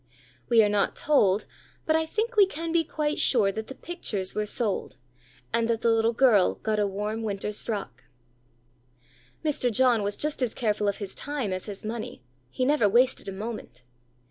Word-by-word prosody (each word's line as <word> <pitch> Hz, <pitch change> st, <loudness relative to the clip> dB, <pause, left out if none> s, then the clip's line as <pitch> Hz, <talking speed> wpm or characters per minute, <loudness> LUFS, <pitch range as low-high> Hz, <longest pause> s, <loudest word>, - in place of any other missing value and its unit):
We 230 Hz, -2 st, +6 dB
are -, -, +3 dB
not 205 Hz, -1 st, +1 dB
told, 210 Hz, -9 st, +2 dB, 0.4 s
but 315 Hz, -, +2 dB
I 320 Hz, 0 st, +1 dB
think 455 Hz, +7 st, -2 dB
we 405 Hz, -2 st, +6 dB
can 330 Hz, -2 st, -5 dB
be 335 Hz, 0 st, +3 dB
quite 300 Hz, -1 st, -2 dB
sure 210 Hz, -6 st, +3 dB
that 220 Hz, +2 st, -6 dB
the 265 Hz, -, -8 dB
pictures 210 Hz, -, -3 dB
were 210 Hz, 0 st, -2 dB
sold, 210 Hz, -2 st, -1 dB, 0.6 s
and 230 Hz, -1 st, +2 dB
that 230 Hz, -1 st, 0 dB
the 230 Hz, -, +3 dB
little 225 Hz, 0 st, +3 dB
girl 230 Hz, -6 st, +4 dB
got 215 Hz, -1 st, -2 dB
a 205 Hz, -, +2 dB
warm 210 Hz, +3 st, -3 dB
winter's 210 Hz, -1 st, -2 dB
frock. 195 Hz, -, -5 dB, 1.4 s
Mr. 275 Hz, -5 st, +1 dB
John 240 Hz, 0 st, +3 dB
was 205 Hz, 0 st, -1 dB
just 300 Hz, -2 st, -2 dB
as 245 Hz, -3 st, -1 dB
careful 210 Hz, -3 st, 0 dB
of 200 Hz, -, 0 dB
his 200 Hz, -2 st, -6 dB
time 275 Hz, -9 st, -3 dB
as 185 Hz, +2 st, -5 dB
his 205 Hz, 0 st, -8 dB
money, 215 Hz, -, -5 dB, 0.3 s
he 255 Hz, -, -1 dB
never 275 Hz, -7 st, +3 dB
wasted 245 Hz, +3 st, +2 dB
a -, -, -3 dB
moment. 205 Hz, -, -7 dB
225 Hz, 185 wpm, -26 LUFS, 205-265 Hz, 1.4 s, We